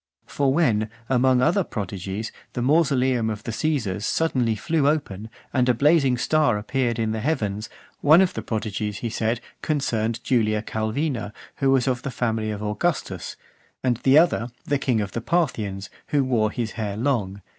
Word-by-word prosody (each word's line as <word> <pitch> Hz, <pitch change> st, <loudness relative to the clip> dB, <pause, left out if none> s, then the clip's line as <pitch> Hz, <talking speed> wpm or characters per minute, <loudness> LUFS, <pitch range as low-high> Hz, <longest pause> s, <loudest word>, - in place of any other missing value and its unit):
For 140 Hz, -2 st, 0 dB
when, 115 Hz, -9 st, +2 dB, 0.2 s
among 130 Hz, 0 st, +3 dB
other 180 Hz, +6 st, +3 dB
prodigies, 100 Hz, -, -5 dB, 0.2 s
the 120 Hz, -, -2 dB
mausoleum 130 Hz, -5 st, +2 dB
of 110 Hz, 0 st, -5 dB
the -, -, -4 dB
Caesars 110 Hz, -6 st, -1 dB
suddenly 125 Hz, -5 st, +1 dB
flew 140 Hz, +8 st, 0 dB
open, 115 Hz, -9 st, -1 dB, 0.2 s
and 125 Hz, -2 st, +2 dB
a 125 Hz, -, +4 dB
blazing 140 Hz, -1 st, +3 dB
star 150 Hz, -3 st, +2 dB
appeared 120 Hz, +2 st, -1 dB
in 110 Hz, -1 st, 0 dB
the 110 Hz, -, -2 dB
heavens; 110 Hz, -6 st, -2 dB, 0.3 s
one 155 Hz, +4 st, +6 dB
of 190 Hz, -1 st, +3 dB
the -, -, -4 dB
prodigies, 105 Hz, -2 st, -3 dB
he 115 Hz, -, -2 dB
said, 115 Hz, +1 st, -1 dB, 0.2 s
concerned 115 Hz, -7 st, -1 dB
Julia 110 Hz, -4 st, +1 dB
Calvina, 110 Hz, +1 st, -2 dB, 0.2 s
who 135 Hz, -, +2 dB
was 135 Hz, -1 st, +3 dB
of 125 Hz, -2 st, 0 dB
the 140 Hz, -, -4 dB
family 110 Hz, -3 st, -1 dB
of 105 Hz, 0 st, -4 dB
Augustus; 105 Hz, +10 st, -2 dB, 0.5 s
and 125 Hz, -3 st, +1 dB
the 135 Hz, +4 st, +4 dB
other, 155 Hz, -7 st, +3 dB, 0.2 s
the 145 Hz, -1 st, 0 dB
king 125 Hz, -5 st, +1 dB
of 100 Hz, -2 st, -4 dB
the 115 Hz, -, -3 dB
Parthians, 110 Hz, -, -1 dB, 0.2 s
who 145 Hz, -2 st, +2 dB
wore 115 Hz, -5 st, +1 dB
his 115 Hz, +1 st, -3 dB
hair 105 Hz, -3 st, -4 dB
long. 105 Hz, -7 st, -1 dB
120 Hz, 170 wpm, -24 LUFS, 110-140 Hz, 0.5 s, one